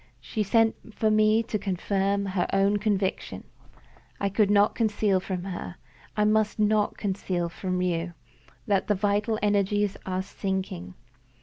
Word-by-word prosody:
"She 125 - -4
sent 225 +1 +1
for 220 -2 +2
me 215 +1 +4
to 220 -2 -3
confirm 200 +1 0
her 185 -2 -1
own 200 +1 +3
conviction. 205 -2 -1 0.8
I 200 - 0
could 200 +1 +2
not 205 0 +4
conceal 210 -3 +1
from 185 -1 -4
her 185 -2 -6 0.4
I 210 - +3
must 215 0 +2
not 210 0 +2
conceal 185 -3 -2
from 180 +1 -2
you 170 -1 -1 0.5
that 200 -2 +1
the 210 - +2
vital 205 +3 0
energies 205 0 +1
are 185 0 -1
sinking. 190 - -4
200 Hz, 140 wpm, -26 LUFS, 185-210 Hz, 0.8 s, me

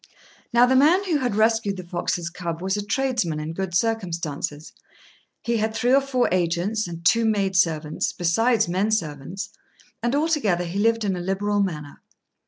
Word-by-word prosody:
Now 240 +1 +6
the 260 +1 +2
man 315 +9 +5
who 350 -6 +1
had 245 -6 -1
rescued 220 -2 +2
the 185 - -6
fox's 175 -1 -3
cub 170 -2 -5
was 190 +2 -1
a 205 - -2
tradesman 230 - -1
in 155 +1 -5
good 190 0 -4
circumstances: 170 -8 -2 0.7
he 235 -1 0
had 220 0 -1
three 245 +2 +2
or 275 - +6
four 260 -2 +1
agents 180 +4 0
and 170 0 -8
two 230 +6 +4
maid 200 -3 +1
servants, 155 -4 +1
besides 220 +6 +2
men 190 +5 0
servants; 185 0 -3 0.5
and 240 +3 0
altogether 285 - +1
he 175 +4 -3
lived 225 +1 +2
in 195 -2 0
a - - -4
liberal 200 +3 0
manner. 150 -7 -4
200 Hz, 175 wpm, -23 LUFS, 170-230 Hz, 0.7 s, Now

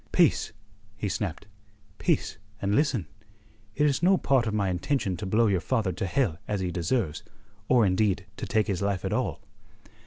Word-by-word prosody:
"Peace!" - - +3 0.5
he 105 - -2
snapped. 95 -1 -3 0.5
"Peace, - - 0 0.2
and 100 0 0
listen! 130 - +2 0.7
It 150 - +2
is 140 -1 +2
no 190 +2 +5
part 130 -7 +2
of 110 - -1
my 100 -2 +1
intention 95 +2 -1
to 100 +2 -5
blow 110 +4 +3
your 100 -4 +2
father 110 -6 0
to 95 +2 -3
hell 105 - 0
as 105 -1 -1
he 90 -1 -2
deserves, 85 0 -1 0.5
or 120 -4 +5
indeed 95 0 +1
to - - -5
take 110 -1 +2
his 95 -3 -2
life 100 -2 -1
at - - -1
all." - - -1
100 Hz, 180 wpm, -27 LUFS, 95-120 Hz, 0.7 s, no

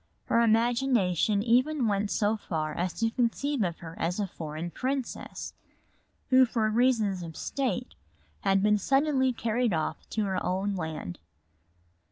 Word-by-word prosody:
Her 230 - +3
imagination 225 -4 +2
even 250 +3 +2
went 205 0 0
so 210 +1 +1
far 155 -7 -3
as 180 +3 -1
to 225 0 0
conceive 255 +3 0
of 175 -4 -1
her 165 -1 -8
as 175 +4 -1
a 205 - +1
foreign 160 -1 -6
princess, 260 +3 -4 0.8
who 260 0 +7
for 225 -2 0
reasons 220 -5 +2
of 165 -2 -8
state 250 -3 -2 0.5
had 195 - +2
been 210 0 +4
suddenly 270 +2 +2
carried 235 -1 0
off 160 -1 -3
to 215 - -1
her 190 -2 -1
own 195 +2 -1
land. 160 - -5
215 Hz, 145 wpm, -28 LUFS, 180-245 Hz, 0.8 s, who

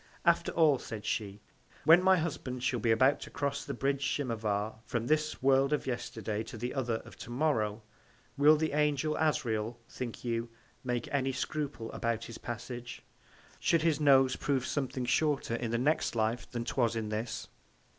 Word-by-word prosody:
After - - +3
all, 155 -5 +4
said 110 -2 -7
she, 100 -2 -2 0.4
when 165 +4 +7
my 190 0 +5
Husband 135 -6 -3
shall 125 -1 +1
be 115 - 0
about 130 +5 +4
to - - -8
cross 140 -2 -2
the 140 - -5
Bridge 135 +2 0
Tchimavar, 110 -6 -1
from 115 0 -2
this 155 0 0
World 135 +1 +4
of 150 - 0
Yesterday, 110 -4 -3
to 115 +1 -8
the 120 +3 -3
other, 120 -5 -1
of - - -12
To - - -9
morrow, 115 -6 0 0.5
will 150 +2 +6
the 160 +1 0
Angel 150 0 +1
Asrael, 115 -7 0
think 120 -2 -6
you, 115 0 -1 0.3
make 125 -2 -2
any 135 -1 +1
Scruple 135 -3 -3
about 115 -1 -2
his 115 - -9
Passage, 120 +1 -6 0.6
should 165 -2 +2
his 160 -3 +2
Nose 135 -3 +5
prove 135 -3 0
something 130 -3 -2
shorter 145 -2 +1
in 115 0 -2
the 115 - 0
next 140 +1 +1
Life 115 +1 0
than 120 -1 -4
'twas 115 0 +1
in 110 -2 -2
this? 110 +2 -3
125 Hz, 175 wpm, -31 LUFS, 115-145 Hz, 0.6 s, when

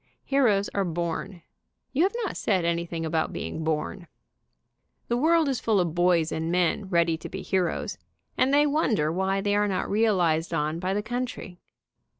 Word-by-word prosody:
Heroes 225 -8 +2
are 200 - -1
born. 170 +1 -4 0.5
You 285 - +1
have 390 +6 +2
not 400 - -3
said 185 -5 0
anything 170 -1 -2
about 160 0 0
being 160 - -5
born. 160 +3 -2 1.0
The 240 - +2
world 320 +3 +3
is 270 -3 0
full 215 -3 +2
of 170 -3 0
boys 175 -2 +2
and 160 +1 -2
men 180 +2 +1
ready 170 -2 +2
to - - -8
be 190 0 -6
heroes, 185 -3 -1 0.4
and 260 - +2
they 290 +1 +5
wonder 245 - +1
why 190 +3 0
they 205 0 +1
are 205 0 +2
not 190 -2 -1
realized 175 -7 +2
on 155 +1 -1
by 185 +2 -1
the 210 - -1
country. 240 -6 -5
185 Hz, 170 wpm, -26 LUFS, 170-220 Hz, 1.0 s, they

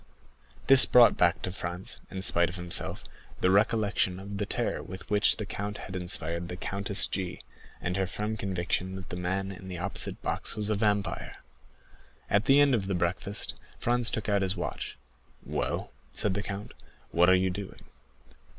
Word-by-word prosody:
This 135 0 +11
brought 120 -2 +6
back 90 +1 +1
to 90 - -2
Franz, 90 0 -4
in 95 0 -4
spite 85 -2 +5
of 90 - -8
himself, 90 -1 0 0.4
the 90 - +3
recollection 100 -2 +1
of 100 +1 -7
the 105 - -2
terror - - -2
with 95 - -10
which 105 0 +4
the 105 - -4
count 100 +1 -5
had 95 - -9
inspired 85 -1 -1
the 90 - -6
Countess 100 +1 +1
G——, 95 -2 -4 0.4
and 90 +1 -3
her 95 -1 0
firm 105 +4 -4
conviction 95 -1 -3
that 95 0 -9
the - - -6
man 95 +2 -3
in 95 0 -10
the 90 -1 -6
opposite 95 +3 -2
box - - -2
was 105 -1 0
a - - +1
vampire. 105 -1 -1 1.0
At 100 +2 +2
the 135 +1 +5
end 145 -2 +4
of 100 -5 0
the 95 - -1
breakfast 90 +3 -2 0.2
Franz 120 0 +1
took 110 - -3
out 100 -1 +1
his 95 0 0
watch. 85 - -5 0.5
"Well," - - -2 0.2
said 105 - 0
the 100 - -2
count, 100 0 -7 0.4
"what 90 +1 +4
are 95 - +6
you 95 0 +1
doing?" 100 +1 -8
95 Hz, 180 wpm, -28 LUFS, 90-105 Hz, 1.0 s, This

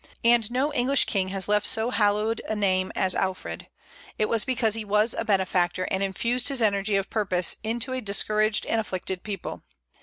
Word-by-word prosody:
And 235 -2 +4
no 265 +5 0
English 270 +1 +3
king 195 -4 -1
has 190 -1 -2
left 210 0 +2
so 225 +2 +3
hallowed 210 0 +1
a 215 - -1
name 185 -2 0
as 185 -1 +1
Alfred: 190 -1 -3 0.5
it 215 - +1
was 230 -2 +1
because 240 -4 0
he 225 0 0
was 210 +2 +1
a - - -3
benefactor, 185 -4 0
and 190 - 0
infused 235 +6 0
his 275 -3 +1
energy 200 -1 +1
of 195 0 -1
purpose 185 -5 0
into 235 +3 -2
a 255 - -3
discouraged 215 +1 +1
and 225 - 0
afflicted 185 -2 -4
people. 200 -4 -6
210 Hz, 185 wpm, -25 LUFS, 195-230 Hz, 0.5 s, And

